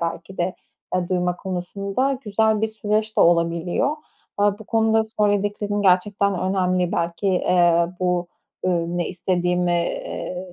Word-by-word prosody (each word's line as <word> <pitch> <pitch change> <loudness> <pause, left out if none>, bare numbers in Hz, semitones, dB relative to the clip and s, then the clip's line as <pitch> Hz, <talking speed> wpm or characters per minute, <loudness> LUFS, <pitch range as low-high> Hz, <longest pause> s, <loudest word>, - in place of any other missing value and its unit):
belki 170 +3 -5
de, 180 +1 0 0.4
eee, 180 -1 0
duyma 180 -1 0
konusunda 200 +8 -2
güzel 215 +1 +2
bir 220 - +1
süreç 215 0 -2
de - - +4
olabiliyor. 170 - +2 0.4
Aaa, 205 0 +2
bu 220 - -11
konuda 220 0 +2
söylediklerin 205 -1 0
gerçekten 195 +1 +2
önemli. 185 -2 +1
Belki, 170 +3 -2
eee, 175 -2 +3
bu, 180 -1 0 0.4
ııı, 170 -1 0
ne 175 - -1
istediğimi, 180 -1 0
eee, 180 +1 -3
185 Hz, 130 wpm, -22 LUFS, 175-205 Hz, 0.4 s, de